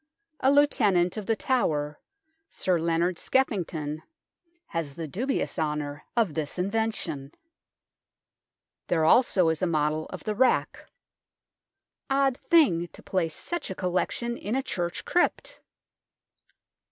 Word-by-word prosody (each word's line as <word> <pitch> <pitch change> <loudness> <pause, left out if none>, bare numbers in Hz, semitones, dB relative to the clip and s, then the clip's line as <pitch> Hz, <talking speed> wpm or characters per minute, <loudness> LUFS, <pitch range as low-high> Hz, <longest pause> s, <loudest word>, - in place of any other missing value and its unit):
A 265 - +4
Lieutenant 200 -11 +3
of 215 -3 -5
The 225 - +2
Tower, 150 - 0 0.5
Sir 180 -2 0
Leonard 170 +2 0
Skeffington, 165 - -1 0.6
has 160 -5 -4
the 165 -2 -5
dubious 245 - -2
honour 150 -1 -2
of 215 -9 +2
this 155 0 -3
invention. 180 -8 -2 1.5
There 160 -3 +2
also 185 -3 +4
is 160 -1 -1
a 185 - +2
model 155 -1 0
of - - -8
the 215 - -1
rack. 255 +4 +1 1.2
Odd 270 -1 +2
thing 250 - +4
to - - -14
place 170 -4 -1
such 345 0 -4
a 190 - -4
collection 190 +7 -1
hi 220 +6 -1
a 270 - -1
church 175 -8 -3
crypt 355 - 0
180 Hz, 120 wpm, -27 LUFS, 160-235 Hz, 1.5 s, A